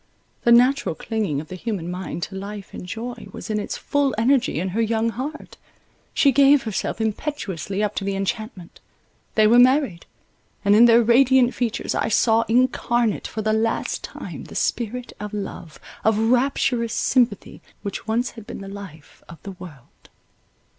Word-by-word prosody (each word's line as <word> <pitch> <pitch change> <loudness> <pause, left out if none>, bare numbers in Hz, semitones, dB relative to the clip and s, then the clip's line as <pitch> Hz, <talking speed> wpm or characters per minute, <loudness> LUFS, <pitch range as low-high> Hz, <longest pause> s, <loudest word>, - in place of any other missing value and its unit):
The 235 - +5
natural 250 - +4
clinging 210 -10 -2
of 155 - -13
the 185 - -6
human 185 -4 -4
mind 180 -1 -5
to 195 - -6
life 200 +1 -7
and 180 - -8
joy 230 +4 -6
was - - -7
in 210 - 0
its 205 - -4
full 285 -2 0
energy 245 - +2
in 185 +3 -2
her 215 +5 -1
young 225 0 +1
heart; 270 +7 -6 0.5
she 280 - +4
gave 280 +1 +5
herself 220 -1 -3
impetuously 210 - -3
up 210 0 -1
to - - -1
the 195 0 -2
enchantment: 195 -1 -5 0.6
they 215 - +5
were 235 +3 +6
married; 255 - +3 0.6
and 200 +1 +5
in 230 +3 +8
their 235 0 +6
radiant 255 +1 +4
features 240 -3 -2
I - - 0
saw 225 0 +3
incarnate, 240 -2 +1
for 215 - -5
the 215 +1 +1
last 225 +1 -1
time, - - -8
the - - -12
spirit 245 +1 -2
of 210 0 -6
love, 190 -5 -7 0.2
of 220 -1 +3
rapturous 240 0 +1
sympathy, 240 -6 0 0.2
which 200 +1 -5
once 235 +3 0
had 225 -3 -12
been - - -7
the 195 - -8
life 195 -7 -11
of 170 - -10
the 200 - -6
world. 165 -9 -14
220 Hz, 170 wpm, -22 LUFS, 200-245 Hz, 0.6 s, in